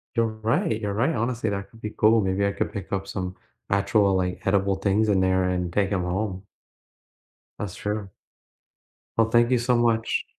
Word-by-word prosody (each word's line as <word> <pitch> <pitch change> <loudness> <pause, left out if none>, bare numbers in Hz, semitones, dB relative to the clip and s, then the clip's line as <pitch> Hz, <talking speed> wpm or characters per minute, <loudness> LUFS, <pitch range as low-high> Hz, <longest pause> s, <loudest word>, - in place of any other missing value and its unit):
You're 115 0 +3
right. 110 0 0
You're 100 -1 -2
right. 130 +9 +1
Honestly, 115 -1 -1
that 100 -1 -4
could 115 - -17
be 105 - -4
cool. 110 +1 +5
Maybe 95 +1 0
I 100 - +1
could 100 - -2
pick 100 -2 -6
up 100 0 -2
some 90 -1 -4 0.3
actual, 100 0 +3
like, 90 -1 -1
edible 100 0 +2
things 100 +3 +1
in 95 -2 +3
there 95 0 +2
and 90 -1 -1
take 100 +1 +1
them 95 -3 0
home. 95 +1 -2 1.2
That's 100 -4 -4
true. 105 -2 -4 1.1
Well, 115 0 +3
thank 120 +2 +4
you 125 - +4
so 125 +1 +2
much. 115 -1 +1
100 Hz, 185 wpm, -25 LUFS, 95-110 Hz, 1.2 s, cool